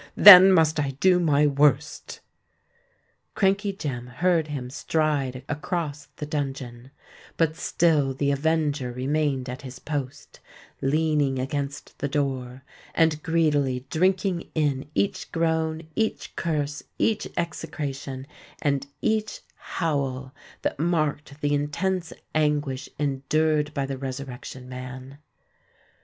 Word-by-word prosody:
Then 190 -1 +11
must 160 -4 +4
I 135 -2 -2
do 185 +1 +5
my 150 -4 +3
worst!" 145 -1 +1 1.1
Crankey 200 +1 +2
Jem 130 -10 -5
heard 160 +5 +1
him 130 -4 -5
stride 145 -4 -1
across 150 0 -3
the 150 - -5
dungeon; 135 -4 -4 0.5
but 160 -1 +2
still 155 -5 +2
the 140 +1 +1
avenger 145 -3 0
remained 135 +1 -1
at 125 +2 -6
his 130 -2 -9
post,—leaning 145 +1 -2
against 140 +2 -4
the 140 - -1
door, 130 -3 -2 0.3
and 160 -2 +3
greedily 145 -6 +1
drinking 185 +1 +1
in 145 -3 0
each 195 -2 -1
groan—each 160 +4 -1
curse—each 155 +7 -1
execration—and 140 -3 -4 0.2
each 215 -1 0
howl, 135 -5 -3 0.3
that - - -2
marked 155 -3 -1
the 145 0 +1
intense 165 +5 -1 0.2
anguish 150 -3 0
endured 150 +2 +1
by 140 -2 0
the 135 -1 -5
Resurrection 130 -1 -7
Man. 130 +2 -8
145 Hz, 105 wpm, -25 LUFS, 135-160 Hz, 1.1 s, Then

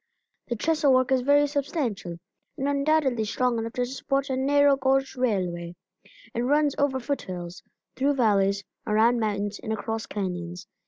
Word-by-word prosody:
The 240 - -2
trestle 305 +3 +2
work 255 0 +2
is 260 -1 +3
very 285 +3 +4
substantial, 275 - -3 0.4
and 270 - -1
undoubtedly 280 -4 +2
strong 235 +2 0
enough 225 0 -4
to 250 - 0
support 275 +2 -2
a - - 0
narrow 285 +1 +4
gauge 270 0 +1
railway. 180 -8 -1 0.6
It 235 - -1
runs 290 +3 +2
over 280 -2 +1
foot 280 +3 -2
hills, 175 -1 -7 0.3
through 280 +2 +1
valleys, 200 -5 +2 0.2
around 225 +3 +3
mountains, 205 -2 -2
and 220 - -5
across 225 +1 -3
canyons. 180 -3 -4
250 Hz, 155 wpm, -26 LUFS, 205-275 Hz, 0.6 s, very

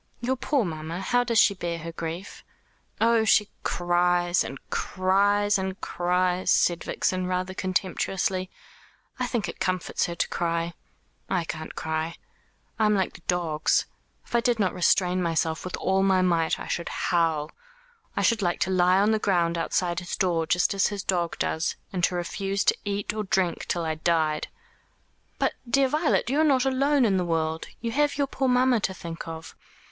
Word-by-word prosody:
"Your 250 +2 0
poor 265 -1 0
mamma! 160 +1 -5
How 245 +6 +1
does 235 -2 0
she 210 - +6
bear 175 -3 -4
her 165 +1 -6
grief?" 165 +4 -6 0.6
"Oh, 230 0 +4
she 210 -1 +4
cries, 175 0 +1
and 135 - -6
cries, 200 +2 +2
and 190 0 -4
cries," 180 +1 0
said 175 -1 +3
Vixen, 185 -1 -1
rather 185 +1 -2
contemptuously. 185 0 -1 0.7
"I 250 - 0
think 230 -7 -1
it 170 - -7
comforts 185 -1 -1
her 170 - -5
to - - 0
cry. 170 0 -1 0.6
I 185 -3 +1
can't 160 -1 -6
cry. 160 +1 -3 0.6
I 215 - +4
am 210 - +3
like 190 -2 0
the - - -13
dogs. 165 -4 +1 0.4
If - - -16
I 235 - +4
did 235 0 +1
not 195 -4 +1
restrain 180 0 +2
myself 160 -1 0
with 185 - -4
all 190 +1 +1
my 190 -1 +3
might 170 -3 +1
I - - -6
should 170 - -3
howl. 160 -3 0 0.7
I - - +1
should 230 -2 +3
like 175 -2 0
to 190 - +1
lie 180 0 +4
on 205 +2 +3
the 220 - +2
ground 175 -5 +1
outside 175 +1 0
his 180 -1 -5
door 170 -3 +1
just 180 +4 +2
as 195 -1 +2
his 205 -2 -4
dog 175 -3 -1
does 160 +1 -1 0.2
and 180 -2 -2
to 180 - -2
refuse 195 +3 -2
to - - +3
eat 205 0 -2
or 215 0 -2
drink 190 -3 0
till 170 -2 -1
I 160 - 0
died." 155 -1 0 0.9
"But, - - +1 0.2
dear 275 +2 +4
Violet, 305 -2 +1
you 275 +5 +1
are - - +5
not 270 -4 +3
alone 275 +1 +3
in 195 -4 +2
the 180 - +1
world. 160 -1 -1
You 230 0 -2
have 290 +3 +1
your 285 - +2
poor 270 -1 -2
mamma 250 -1 +3
to 190 -2 -2
think 165 -2 -7
of." 160 -1 -8
185 Hz, 185 wpm, -26 LUFS, 170-210 Hz, 0.9 s, she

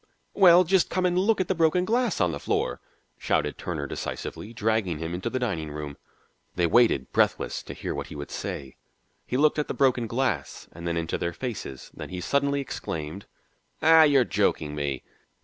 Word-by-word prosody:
"Well, 180 -2 +7
just 185 0 +2
come 185 0 0
and 180 -1 +2
look 200 +4 +2
at 185 - 0
the - - +1
broken 170 +1 +2
glass 235 0 +1
on 90 -3 +2
the - - -5
floor," - - -1 0.4
shouted - - 0
Turner 80 -5 -3
decisively, 105 +8 -5
dragging 110 -6 0
him 80 +2 -4
into 95 +6 -3
the 130 - -2
dining 95 -12 -2
room. 75 -1 -6 0.6
They 90 - +2
waited, 85 - +3
breathless, - - +1
to - - -9
hear - - -4
what - - -5
he - - -9
would 70 0 -7
say. 65 -2 -6 0.5
He 125 - -1
looked 150 +2 +3
at 150 - -1
the - - -4
broken 125 -4 +2
glass 115 - -2
and 85 +1 -7
then 85 0 -1
into 85 -1 -2
their 85 - -2
faces. 105 - -6
Then - - -8
he 90 - -5
suddenly 140 +8 +1
exclaimed: 80 - -5 0.6
"Ah, 160 0 +8
you're 145 -4 +6
joking 90 -6 0
me." 70 -3 -3
110 Hz, 190 wpm, -26 LUFS, -, 0.6 s, Ah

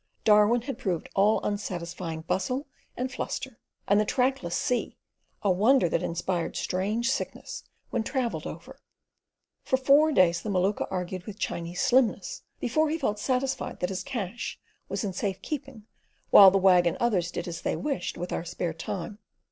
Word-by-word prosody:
Darwin 215 +2 +5
had 275 +1 -5
proved 180 -5 -2
all 205 +3 +4
unsatisfying 175 -5 -4
bustle 250 - -1 0.3
and 255 +1 -2
fluster, 260 -2 -5 0.3
and 200 +1 +4
the - - +4
trackless 250 -6 0
sea, 250 - -1 0.5
a 200 - +3
wonder 220 +5 +4
that 165 - 0
inspired 175 0 -2
strange 215 +7 0
sickness - - -4 0.3
when - - 0
travelled 250 0 -2
over. - - -9 0.8
For 260 - +1
four 285 +4 +5
days 175 - +4
the 215 - -5
Maluka 195 +1 +1
argued 180 0 -4
with 210 -1 -7
Chinese 175 -4 -3
slimness 260 - +2 0.2
before 310 +6 +1
he 320 - 0
felt 210 -9 -1
satisfied 260 +3 -1
that 180 - -1
his 190 -1 -3
cash 235 -3 -4 0.3
was - - -2
in 195 -3 -2
safe 190 0 -2
keeping 275 -7 -6 0.5
while 195 -1 +11
the 195 - +2
Wag 180 -2 +5
and 170 - 0
others 195 -8 +1
did - - -5
as 170 -1 -5
they - - -1
wished 280 -2 -3
with 175 +1 -4
our - - -2
spare 170 -1 -3
time. 180 +5 -5
205 Hz, 165 wpm, -27 LUFS, 180-255 Hz, 0.8 s, while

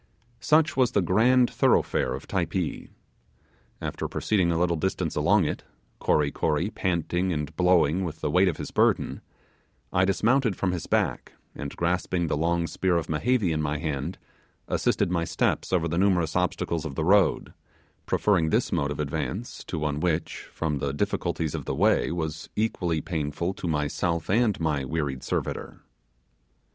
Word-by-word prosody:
Such 155 +5 +3
was 130 -2 +2
the 100 - +3
grand 120 +7 +4
thoroughfare - - +1
of 65 - -9
Typee. 90 -2 -2 0.9
After - - -4
proceeding 95 -5 +1
a 85 - 0
little 85 -1 +2
distance 95 +4 -2
along - - +3
it - - -3 0.4
Kory 75 -1 +2
Kory 80 +6 0
panting 90 -1 -1
and 75 -1 -3
blowing 90 -1 +3
with 80 -3 -5
the - - -2
weight 95 +2 +4
of 85 - 0
his - - -6
burden - - +1 0.7
I 90 - +3
dismounted 115 +3 +2
from 90 - 0
his 90 -3 -4
back, - - 0 0.2
and 70 -1 -6
grasping 85 0 0
the 80 - -1
long 85 +2 +1
spear 90 +1 0
of 85 - -3
Mehevi 100 +4 +1
in 80 -1 0
my 75 0 -1
hand, 75 +2 -3 0.5
assisted - - +1
my 85 -2 +1
steps - - -1
over 85 -3 +2
the 85 +2 -1
numerous 90 -5 +2
obstacles 90 -3 0
of 75 -4 -5
the 80 - -1
road; 100 0 +3 0.5
preferring 90 -7 +2
this - - +1
mode 70 - 0
of 75 - -5
advance 95 - -4
to 85 - -4
one 75 -1 -1
which, 85 -1 -2
from 75 -3 -2
the 70 0 -2
difficulties 75 +1 -1
of - - -4
the - - -2
way, - - +2
was 80 -2 -4
equally 90 -7 0
painful 80 +1 -2
to 90 - -6
myself 80 +2 -1
and 110 -1 +2
my 75 -4 0
wearied 70 -2 -2
servitor. - - -4
85 Hz, 165 wpm, -26 LUFS, 75-95 Hz, 0.9 s, grand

